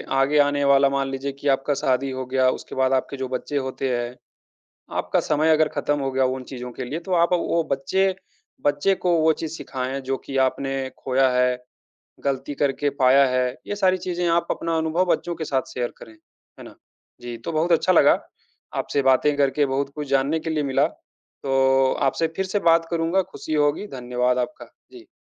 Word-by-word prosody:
आगे 135 Hz, +2 st, +3 dB
आने 145 Hz, 0 st, +3 dB
वाला 140 Hz, 0 st, +5 dB
मान 135 Hz, 0 st, -1 dB
लीजिए 135 Hz, +1 st, -3 dB
कि 140 Hz, +1 st, -7 dB
आपका 135 Hz, +2 st, +1 dB
शादी 135 Hz, 0 st, 0 dB
हो 130 Hz, 0 st, -4 dB
गया, 130 Hz, 0 st, +2 dB
उसके -, -, -5 dB
बाद 130 Hz, 0 st, +2 dB
आपके 135 Hz, +1 st, -1 dB
जो 130 Hz, 0 st, -3 dB
बच्चे 130 Hz, +3 st, -3 dB
होते 130 Hz, 0 st, -2 dB
हैं, 120 Hz, +1 st, -4 dB, 0.8 s
आपका -, -, +1 dB
समय 155 Hz, +1 st, +1 dB
अगर 155 Hz, 0 st, +3 dB
खत्म 145 Hz, 0 st, 0 dB
हो 135 Hz, -1 st, -1 dB
गया 130 Hz, 0 st, +2 dB
उन 130 Hz, 0 st, -2 dB
चीज़ों 125 Hz, -1 st, -8 dB
के 130 Hz, -, -6 dB
लिए, 140 Hz, +6 st, -4 dB
तो 185 Hz, +2 st, -6 dB
आप 170 Hz, +1 st, +3 dB
अ, -, -, +5 dB
वो 170 Hz, -1 st, 0 dB
बच्चे, 190 Hz, +8 st, +1 dB, 0.5 s
बच्चे 145 Hz, +7 st, +2 dB
को 180 Hz, -2 st, +1 dB
वो 160 Hz, 0 st, +4 dB
चीज़ 160 Hz, -2 st, -4 dB
सिखाएँ 130 Hz, -1 st, -4 dB
जो 135 Hz, 0 st, -2 dB
कि 135 Hz, -, -4 dB
आपने 135 Hz, 0 st, -3 dB
खोया 130 Hz, 0 st, +2 dB
है, 125 Hz, 0 st, +2 dB, 0.7 s
गलती 135 Hz, +1 st, -2 dB
करके 145 Hz, +1 st, 0 dB
पाया 135 Hz, +2 st, +6 dB
है। 125 Hz, -1 st, +1 dB, 0.2 s
ये 205 Hz, -, -3 dB
सारी 190 Hz, -2 st, +3 dB
चीज़ें 180 Hz, -1 st, -2 dB
आप 170 Hz, 0 st, +2 dB
अपना 165 Hz, 0 st, -1 dB
अनुभव 160 Hz, +3 st, +1 dB
बच्चों 175 Hz, -, -4 dB
के 165 Hz, -, -5 dB
साथ 130 Hz, -2 st, -2 dB
शेयर 120 Hz, -1 st, -2 dB
करें, 110 Hz, -, -12 dB, 0.5 s
है -, -, -10 dB
ना? -, -, -12 dB, 0.5 s
जी, 120 Hz, -1 st, -6 dB
तो 115 Hz, -, -6 dB
बहुत 165 Hz, +2 st, +1 dB
अच्छा 175 Hz, +2 st, +3 dB
लगा, 175 Hz, -, +5 dB, 0.6 s
आपसे 140 Hz, -, -1 dB
बातें 135 Hz, +2 st, +3 dB
करके, 145 Hz, +1 st, +2 dB
बहुत 135 Hz, +1 st, -1 dB
कुछ 150 Hz, -2 st, -5 dB
जानने 140 Hz, +4 st, +1 dB
के 160 Hz, -, -4 dB
लिए 155 Hz, -1 st, 0 dB
मिला, 135 Hz, -2 st, +2 dB, 0.6 s
तो 135 Hz, -1 st, +3 dB, 0.2 s
आपसे 165 Hz, +5 st, 0 dB
फिर 190 Hz, -, -1 dB
से 190 Hz, +2 st, 0 dB
बात 165 Hz, 0 st, +3 dB
करूँगा, 170 Hz, +3 st, +1 dB
खुशी 155 Hz, -, -6 dB
होगी, 150 Hz, +6 st, +1 dB
धन्यवाद 125 Hz, 0 st, 0 dB
आपका। 125 Hz, +5 st, -4 dB, 0.3 s
जी। 360 Hz, -2 st, -13 dB
140 Hz, 200 wpm, -23 LUFS, 130-160 Hz, 0.8 s, पाया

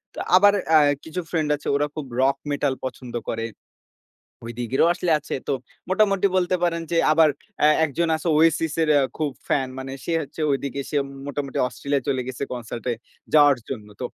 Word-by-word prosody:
তো -, -, -6 dB, 0.2 s
আবার 205 Hz, +2 st, +7 dB, 0.2 s
আ -, -, +9 dB, 0.3 s
কিছু 160 Hz, +3 st, -5 dB
ফ্রেন্ড 155 Hz, -3 st, 0 dB
আছে, 145 Hz, -, -10 dB
ওরা 145 Hz, +1 st, +1 dB
খুব 155 Hz, -, -4 dB, 0.2 s
রক 135 Hz, +1 st, +3 dB
মেটাল 140 Hz, -1 st, 0 dB
পছন্দ 125 Hz, -1 st, -7 dB
করে। 115 Hz, 0 st, -2 dB, 1.0 s
ওইদিকেরও 120 Hz, +5 st, 0 dB
আসলে 175 Hz, -1 st, -1 dB
আছে। 150 Hz, -, -7 dB
তো 140 Hz, -, +1 dB, 0.4 s
মোটামুটি 200 Hz, 0 st, +3 dB
বলতে 185 Hz, 0 st, +2 dB
পারেন 170 Hz, -1 st, +1 dB
যে; 170 Hz, -, +2 dB
আবার 155 Hz, 0 st, +5 dB, 0.4 s
এ -, -, +7 dB, 0.2 s
একজন 165 Hz, +4 st, -1 dB
আছে 160 Hz, +2 st, -4 dB
ওয়েসিস 165 Hz, -1 st, +3 dB
এর 155 Hz, -, 0 dB
অ্যা 140 Hz, -, +4 dB
খুব 155 Hz, -2 st, -1 dB, 0.2 s
ফ্যান, 135 Hz, -2 st, +1 dB
মানে 135 Hz, 0 st, -6 dB
সে 170 Hz, -, -1 dB
হচ্ছে 155 Hz, +2 st, -7 dB
ঐদিকে 140 Hz, 0 st, -2 dB
সে 150 Hz, -, 0 dB, 0.3 s
মোটামুটি 140 Hz, -1 st, -4 dB
অস্ট্রেলিয়া 140 Hz, +1 st, -2 dB
চলে 130 Hz, -2 st, +1 dB
গেছে, 130 Hz, +1 st, -4 dB
কনসার্ট 120 Hz, -1 st, -7 dB
এ -, -, +1 dB, 0.4 s
যাওয়ার 145 Hz, -3 st, +6 dB
জন্য। 110 Hz, -6 st, -5 dB
তো -, -, -1 dB
145 Hz, 180 wpm, -23 LUFS, 135-165 Hz, 1.0 s, আ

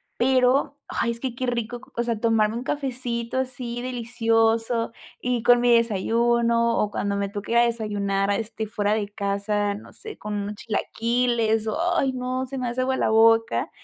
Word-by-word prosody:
pero 260 Hz, +3 st, +2 dB
¡ay!, 235 Hz, -, -1 dB
es 230 Hz, -, -6 dB
que 255 Hz, -2 st, -4 dB
qué 255 Hz, 0 st, -3 dB
rico. 240 Hz, 0 st, -3 dB, 0.2 s
O 235 Hz, -, +2 dB
sea, 235 Hz, -2 st, -1 dB
tomarme 225 Hz, -1 st, +2 dB
un 245 Hz, -, -4 dB
cafecito 255 Hz, -4 st, -3 dB
así 245 Hz, -2 st, -4 dB
delicioso, 230 Hz, -1 st, 0 dB, 0.3 s
y 245 Hz, -2 st, -1 dB
con 245 Hz, 0 st, +6 dB
mi 240 Hz, -1 st, +5 dB
desayuno, 235 Hz, +2 st, +2 dB
o 210 Hz, -1 st, 0 dB
cuando 200 Hz, 0 st, -1 dB
me 200 Hz, 0 st, -1 dB
toque 205 Hz, +2 st, -6 dB
ir 235 Hz, -, +3 dB
a 240 Hz, -, +6 dB
desayunar 205 Hz, -4 st, -1 dB
a -, -, +1 dB
este 220 Hz, -1 st, -4 dB
fuera 205 Hz, -1 st, 0 dB
de 210 Hz, -2 st, -1 dB
casa. 205 Hz, 0 st, -1 dB
No 205 Hz, -, -11 dB
sé 435 Hz, -1 st, -9 dB
con 210 Hz, 0 st, -6 dB
unos 205 Hz, +1 st, -3 dB
chilaquiles. 225 Hz, +1 st, 0 dB, 0.3 s
¡Ay, 265 Hz, -4 st, +1 dB
no!, 255 Hz, +1 st, -2 dB
se 270 Hz, +1 st, -6 dB
me 250 Hz, -2 st, -2 dB
hace 250 Hz, +2 st, -2 dB
agua 260 Hz, +1 st, +1 dB
la -, -, +1 dB
boca. 225 Hz, 0 st, +4 dB
230 Hz, 180 wpm, -24 LUFS, 215-245 Hz, 0.3 s, con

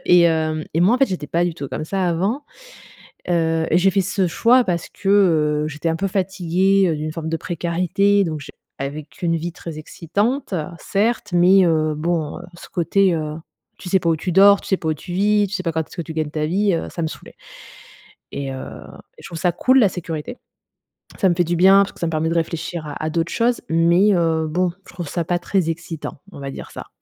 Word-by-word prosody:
et 180 Hz, -1 st, +6 dB
hem, 160 Hz, -2 st, +1 dB
et 165 Hz, -, +2 dB
moi, 190 Hz, +7 st, +5 dB
en -, -, -6 dB
fait, 270 Hz, -, +4 dB
j'étais 180 Hz, -6 st, -4 dB
pas 170 Hz, +5 st, +1 dB
du 170 Hz, -, -3 dB
tout 145 Hz, -4 st, -6 dB
comme -, -, -4 dB
ça 190 Hz, +2 st, -1 dB
avant. 190 Hz, -, 0 dB, 0.9 s
Heu, 165 Hz, -2 st, +1 dB
j'ai 180 Hz, +3 st, +4 dB
fait 195 Hz, +1 st, +1 dB
ce 190 Hz, 0 st, 0 dB
choix 235 Hz, +8 st, +4 dB
parce 170 Hz, -2 st, -2 dB
que, 195 Hz, -, -6 dB, 0.6 s
heu, -, -, -3 dB
j'étais 155 Hz, +2 st, -2 dB
un 165 Hz, -, -1 dB
peu 195 Hz, -, -1 dB
fatiguée, 190 Hz, 0 st, +1 dB
heu, 160 Hz, -, 0 dB
d'une 155 Hz, +1 st, -4 dB
forme 160 Hz, 0 st, -5 dB
de 165 Hz, -, -1 dB
précarité 180 Hz, +5 st, +1 dB
donc, 155 Hz, -3 st, -4 dB
je 145 Hz, -, -10 dB, 0.3 s
avec 145 Hz, +2 st, -6 dB
une 165 Hz, -1 st, +1 dB
vie 170 Hz, +2 st, -4 dB
très 165 Hz, -2 st, -8 dB
excitante, 205 Hz, -, -2 dB, 0.2 s
certes, 210 Hz, +1 st, -1 dB
mais, 185 Hz, +2 st, +6 dB
heu, 155 Hz, -2 st, +1 dB
bon, 160 Hz, -1 st, -2 dB
heu, -, -, -11 dB
ce 170 Hz, -, -12 dB
côté, 185 Hz, +2 st, +2 dB
heu, 155 Hz, -2 st, -3 dB, 0.4 s
tu 180 Hz, -, -9 dB
sais 190 Hz, -, +4 dB
pas 170 Hz, -, -2 dB
où 160 Hz, -, +2 dB
tu 180 Hz, +4 st, -3 dB
dors, 200 Hz, +2 st, +7 dB
tu -, -, -10 dB
sais 190 Hz, -, +2 dB
pas 160 Hz, -, -4 dB
où 155 Hz, -, +1 dB
tu 175 Hz, +4 st, -9 dB
vis, 205 Hz, +2 st, +2 dB
tu 200 Hz, -, -6 dB
sais 185 Hz, -, -2 dB
pas 170 Hz, -, -1 dB
quand 160 Hz, -, -1 dB
est-ce -, -, -15 dB
que 170 Hz, -, -2 dB
tu 160 Hz, -, -8 dB
gagnes 155 Hz, -2 st, -2 dB
ta 155 Hz, 0 st, -2 dB
vie, 195 Hz, +5 st, +1 dB
heu, 165 Hz, -, -3 dB
ça 170 Hz, -, -5 dB
me -, -, 0 dB
saoulait 155 Hz, -, -9 dB, 1.0 s
et 140 Hz, -1 st, -4 dB
heu, 130 Hz, 0 st, -6 dB, 0.6 s
je -, -, -12 dB
trouve 170 Hz, -, -7 dB
ça 175 Hz, +1 st, +1 dB
cool 260 Hz, +9 st, +3 dB
la 210 Hz, -6 st, +5 dB
sécurité. 170 Hz, +5 st, -6 dB, 0.8 s
Ça 190 Hz, -, +4 dB
me 175 Hz, -, +1 dB
fait 175 Hz, -, +2 dB
du 175 Hz, +1 st, -1 dB
bien 195 Hz, +3 st, +6 dB
parce 200 Hz, -, -7 dB
que -, -, -18 dB
ça 170 Hz, -, -1 dB
me -, -, -2 dB
permet 160 Hz, 0 st, 0 dB
de -, -, 0 dB
réfléchir 165 Hz, 0 st, -3 dB
à 145 Hz, +1 st, -6 dB
à 155 Hz, -, -1 dB
d'autres 165 Hz, +1 st, -1 dB
choses, 240 Hz, +1 st, +1 dB
mais, 170 Hz, +5 st, +4 dB
heu, 165 Hz, -2 st, +1 dB
bon, 175 Hz, +3 st, 0 dB, 0.2 s
je -, -, -14 dB
trouve 175 Hz, -3 st, -6 dB
ça 170 Hz, +4 st, -2 dB
pas 175 Hz, +2 st, 0 dB
très 175 Hz, -2 st, 0 dB
excitant, 165 Hz, -3 st, -6 dB
on -, -, -11 dB
va 140 Hz, 0 st, -5 dB
dire -, -, -9 dB
ça. -, -, -9 dB
170 Hz, 240 wpm, -21 LUFS, 160-190 Hz, 1.0 s, dors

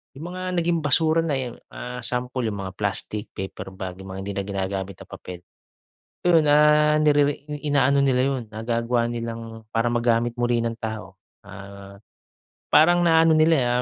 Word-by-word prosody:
'yung 145 Hz, +5 st, -8 dB
mga 185 Hz, 0 st, -6 dB, 0.2 s
naging 170 Hz, 0 st, +1 dB
basura 160 Hz, +3 st, +3 dB
na 155 Hz, -4 st, -1 dB
'yan 125 Hz, -3 st, -4 dB, 0.2 s
ah, 125 Hz, 0 st, -6 dB
sample 125 Hz, +1 st, -2 dB
'yung 105 Hz, -2 st, -4 dB
mga 95 Hz, -, -5 dB
plastic, 105 Hz, +1 st, -3 dB
paper 95 Hz, 0 st, -7 dB
bag, 95 Hz, -1 st, -7 dB
'yung 95 Hz, 0 st, -10 dB
mga -, -, -6 dB
hindi 100 Hz, +1 st, -5 dB
na 100 Hz, -, -1 dB
ginagamit 95 Hz, -1 st, -3 dB
na -, -, -21 dB
papel. 90 Hz, -1 st, -9 dB, 0.9 s
'Yun, 170 Hz, -3 st, +5 dB
ah, 150 Hz, +1 st, +5 dB
nirere 145 Hz, -1 st, +2 dB, 0.2 s
inaano 140 Hz, -2 st, +2 dB
nila 130 Hz, -2 st, +2 dB
'yun, 135 Hz, -2 st, -1 dB
nagagawa 115 Hz, +2 st, -1 dB
nilang 115 Hz, -1 st, -6 dB
para 115 Hz, +1 st, +1 dB
magamit 120 Hz, 0 st, +1 dB
muli 120 Hz, -1 st, +1 dB
ng 115 Hz, 0 st, -2 dB
tao. 110 Hz, -4 st, -6 dB, 0.3 s
Ah, 100 Hz, 0 st, -11 dB, 0.7 s
parang 175 Hz, +3 st, +5 dB
na 165 Hz, -1 st, +5 dB
ano 165 Hz, -, +4 dB
nila, 140 Hz, -7 st, +3 dB
120 Hz, 165 wpm, -23 LUFS, 105-145 Hz, 0.9 s, Yun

